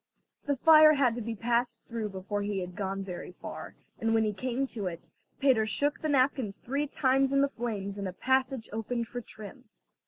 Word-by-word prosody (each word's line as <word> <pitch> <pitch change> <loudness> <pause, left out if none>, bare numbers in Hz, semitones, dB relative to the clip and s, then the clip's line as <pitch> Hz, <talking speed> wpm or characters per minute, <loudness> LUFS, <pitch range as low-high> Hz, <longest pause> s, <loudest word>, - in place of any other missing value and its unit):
The 285 - +2
fire 310 +2 +8
had 270 -5 +3
to 240 - -4
be 230 +1 -4
passed 235 +1 -1
through 230 -3 -3
before 195 +2 -4
he 205 0 -2
had 180 0 -7
gone 195 0 -3
very 180 -1 -7
far, - - -8 0.2
and 225 0 +1
when 225 - +3
he 210 -1 0
came 255 +5 -1
to 220 -7 -4
it, 170 -1 -7 0.3
Peter 250 -6 +3
shook 285 +7 0
the 310 - -1
napkins 255 -6 +1
three 280 +4 -2
times 270 0 +2
in 275 0 +3
the 280 - +4
flames 210 -6 -4
and 200 - -3
a 185 - -5
passage 260 +1 0
opened 230 +1 -2
for 245 +1 -5
trim. 215 +4 -11
235 Hz, 205 wpm, -29 LUFS, 205-265 Hz, 0.3 s, fire